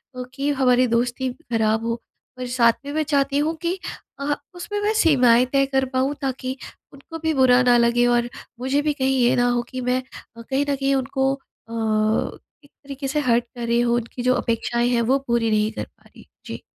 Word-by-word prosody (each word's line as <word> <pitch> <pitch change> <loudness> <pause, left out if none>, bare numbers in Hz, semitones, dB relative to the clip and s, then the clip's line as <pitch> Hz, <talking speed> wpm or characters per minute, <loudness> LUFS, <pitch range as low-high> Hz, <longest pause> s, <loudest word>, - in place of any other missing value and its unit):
अ, 250 - -4
कि 275 +2 -2
हमारी 255 -2 +3
दोस्ती 245 +2 0
खराब 225 -6 -1
हो। 230 0 -2 0.4
और 250 - -4
साथ 240 -2 +3
में 285 - -5
मैं 310 0 +1
चाहती 280 -1 +1
हूँ 315 +3 0
कि 350 +2 -2 0.4
अह, 290 +1 -1 0.2
उसमें 415 +4 -5
मैं 425 +1 +1
सीमाएँ 255 - +4
तय 275 0 +4
कर 270 -1 0
पाऊँ, 265 +2 +1
ताकि 260 0 -3 0.4
उनको 325 +4 -10
भी 320 0 0
बुरा 255 -2 +5
ना 245 -1 +5
लगे 235 +1 +3
और 240 0 +2 0.3
मुझे 265 +3 0
भी 300 0 0
कहीं 265 -1 0
ये 240 - +3
ना 245 0 +2
हो 245 0 +1
कि 255 0 -5
मैं 250 +1 0 0.4
अ, - - -8
कहीं 270 +4 -1
न 280 - +2
कहीं 275 0 0
उनको 270 0 0 0.4
अ, - - -11 0.9
एक 285 - -20
तरीके 275 -1 -8
से 295 +3 -1
हर्ट 240 -4 +2
कर 240 -1 -4
रही 235 0 +2
हूँ 240 0 +2
उनकी 240 +1 -4
जो 255 0 +3
अपेक्षाएँ 235 +1 0
हैं 240 -1 +2
वो 270 - +4
पूरी 235 -1 +1
नहीं 215 0 +1
कर - - -5
पा - - -32
रही। - - -17 0.2
जी। - - -7
255 Hz, 210 wpm, -22 LUFS, 240-280 Hz, 0.9 s, बुरा